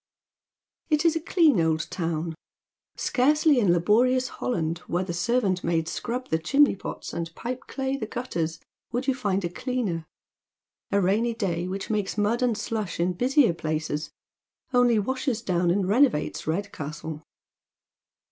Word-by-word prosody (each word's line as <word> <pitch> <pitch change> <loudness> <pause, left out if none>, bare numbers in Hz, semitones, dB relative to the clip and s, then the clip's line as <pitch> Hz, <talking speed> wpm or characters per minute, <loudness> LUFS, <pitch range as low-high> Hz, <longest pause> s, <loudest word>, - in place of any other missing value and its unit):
It 305 +1 +2
is 330 -1 +4
a - - +1
clean 320 - +4
old 160 0 +1
town. 165 -1 -2 0.6
Scarcely 295 +2 +3
in 200 -7 +4
laborious 240 +9 +3
Holland, 170 -7 -2
where 175 +2 0
the 180 -2 -4
servant 190 0 +1
maids 165 -1 0
scrab 250 +2 -4
the 160 - +1
chimney 275 - +4
pots - - -7
and 165 0 -3
pipe 255 +1 -5
clay 270 0 -2
the 220 - -4
gutters, 165 -10 -3 0.3
would 245 +2 -2
you 270 - +4
find 200 -7 -1
a - - +1
cleaner. 195 -6 -3 0.8
A 200 - +3
rainy 215 +5 +1
day, 180 -6 -1
which 195 +3 -4
makes 210 -1 -1
mud 210 +4 +1
and 240 -4 +2
slush 215 -5 -3
in 180 +2 +1
busier 250 - +3
places, 155 -2 -3 0.6
only 245 -2 +4
washes 255 +1 -1
down 175 -4 +1
and 185 +1 +1
renovates 230 - +2
Red 200 +6 -1
castle. 150 +1 -6
205 Hz, 150 wpm, -26 LUFS, 170-250 Hz, 0.8 s, is